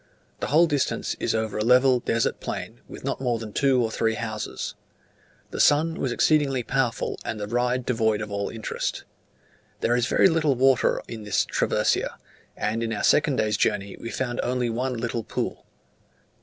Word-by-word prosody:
The - - -2
whole 160 +4 +5
distance 145 -5 -1
is - - 0
over 110 -1 -2
a - - +1
level 125 +2 +5
desert 115 -1 0
plain, - - -5
with - - -10
not - - -3
more 120 -3 0
than 110 -2 -8
two 135 -3 +3
or 110 - -1
three 110 0 0
houses. 110 -1 -4 0.8
The - - -5
sun 155 +3 +4
was 135 -5 -2
exceedingly 135 -2 +2
powerful, 125 -1 -1
and 110 - -4
the 105 - -3
ride 125 +3 0
devoid 110 -3 +1
of 105 -1 -5
all 100 0 -2
interest. 110 -2 -4 0.8
There 120 - +2
is 120 0 +1
very - - +5
little 160 -5 +2
water 130 0 +3
in 115 -2 -7
this 105 -1 +1
"traversia," - - 0 0.4
and 110 +2 -1
in 115 -1 -2
our 105 -2 -3
second 145 -2 +3
day's 110 -3 +1
journey 100 0 0
we 115 - -7
found 120 -1 -3
only 125 -1 -1
one 125 +2 -2
little 115 0 -2
pool. - - -4
120 Hz, 180 wpm, -25 LUFS, 110-130 Hz, 0.8 s, whole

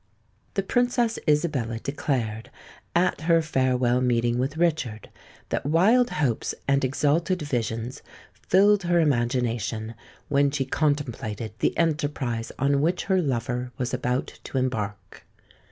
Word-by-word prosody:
The 195 - +1
Princess 245 +1 +1
Isabella 145 -7 +1
declared, 115 -4 -3 0.5
at 175 -3 +2
her 165 +1 +4
farewell 130 -4 +1
meeting 120 -1 +1
with 135 +4 -2
Richard, 155 - -1 0.4
that - - -1
wild 205 - +4
hopes 135 - -1
and 140 0 +2
exalted 150 +6 +1
visions 120 -3 -3 0.5
filled 200 +2 +5
her 175 -1 +2
imagination 120 -5 0 0.3
when 140 0 +3
she 135 -1 -1
contemplated 125 -7 -1
the - - 0
enterprise 145 -8 -1
on 140 +1 +2
which 175 +4 +1
her 190 -2 +2
lover 125 -3 -2
was 125 0 -2
about 125 0 -2
to - - -4
embark. 110 -6 -3
135 Hz, 120 wpm, -25 LUFS, 120-160 Hz, 0.5 s, filled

